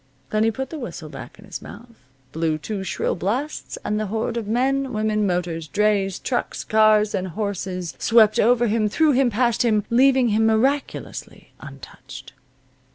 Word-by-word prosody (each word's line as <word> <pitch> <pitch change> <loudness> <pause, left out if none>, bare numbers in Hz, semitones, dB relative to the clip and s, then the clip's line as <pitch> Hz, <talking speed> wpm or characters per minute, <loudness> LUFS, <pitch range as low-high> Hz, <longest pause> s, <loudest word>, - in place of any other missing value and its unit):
Then 215 0 +2
he 225 - +3
put 265 +4 -5
the 320 - -6
whistle 245 - -7
back - - -10
in - - -15
his - - -7
mouth, 235 0 -12 0.4
blew 160 +1 -1
two 195 +5 -5
shrill 190 - -2
blasts, 245 - -3
and 210 0 -1
the 215 - -2
horde 220 +3 -2
of 230 -3 -3
men, 265 +3 0
women, 215 -1 0
motors, 175 -3 -2
drays, 200 0 +1
trucks, 245 - -3
cars, 215 -1 +3
and 190 -2 -2
horses 185 -3 -4
swept 220 -2 +4
over 240 +1 +4
him, 215 -1 +1
through 310 +7 +3
him, 260 -1 +3
past 235 +1 +1
him, 215 -3 +2
leaving 260 0 +4
him 220 +1 +2
miraculously 265 +6 -2
untouched. - - -11
215 Hz, 165 wpm, -22 LUFS, 200-245 Hz, 0.4 s, swept